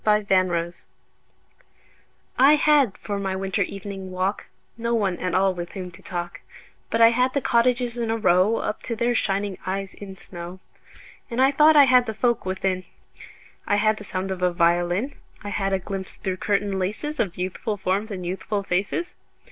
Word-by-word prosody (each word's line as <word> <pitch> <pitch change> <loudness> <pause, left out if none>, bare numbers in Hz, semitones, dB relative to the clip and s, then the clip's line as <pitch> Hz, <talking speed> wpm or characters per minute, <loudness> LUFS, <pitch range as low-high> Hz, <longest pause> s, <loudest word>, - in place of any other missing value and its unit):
Good 210 -1 +2
Hours 175 -2 +1 1.5
I 275 +4 +6
HAD 295 -8 +3
for 205 -1 -4
my 190 -1 -2
winter 195 +1 -2
evening 195 0 -5
walk 185 +2 -2 0.3
No 235 0 -1
one 195 -5 0
at 180 - -2
all 190 0 +3
with 175 -1 -7
whom 185 -2 -6
to - - -15
talk, 175 -1 -5 0.5
But 230 - 0
I 230 - +9
had 250 +3 +1
the - - +3
cottages 245 -1 +1
in 230 -1 -1
a 225 - +1
row 195 +1 +3
Up 210 - -3
to 235 - -4
their 240 +2 +1
shining 200 -3 -1
eyes 195 +1 -3
in 195 -2 -10
snow. 175 +1 -9 0.7
And 235 - -3
I 265 +1 +5
thought 300 +2 +5
I 290 - +9
had 250 -2 +5
the 220 - -3
folk 235 -3 0
within: 185 0 -1 0.8
I 205 - +3
had 215 +1 +2
the 210 - -8
sound 190 -1 -4
of 185 -1 -4
a 180 0 +3
violin; 175 +8 +1 0.3
I 205 - -5
had 195 -1 -1
a 195 - +2
glimpse 190 0 -6
through 185 -1 -3
curtain 200 -1 0
laces 215 +11 -3
Of 185 -5 -1
youthful 185 +4 -3
forms 195 +3 -1
and 185 -4 -5
youthful 200 +3 -3
faces. 195 - -1
200 Hz, 185 wpm, -24 LUFS, 185-230 Hz, 1.5 s, I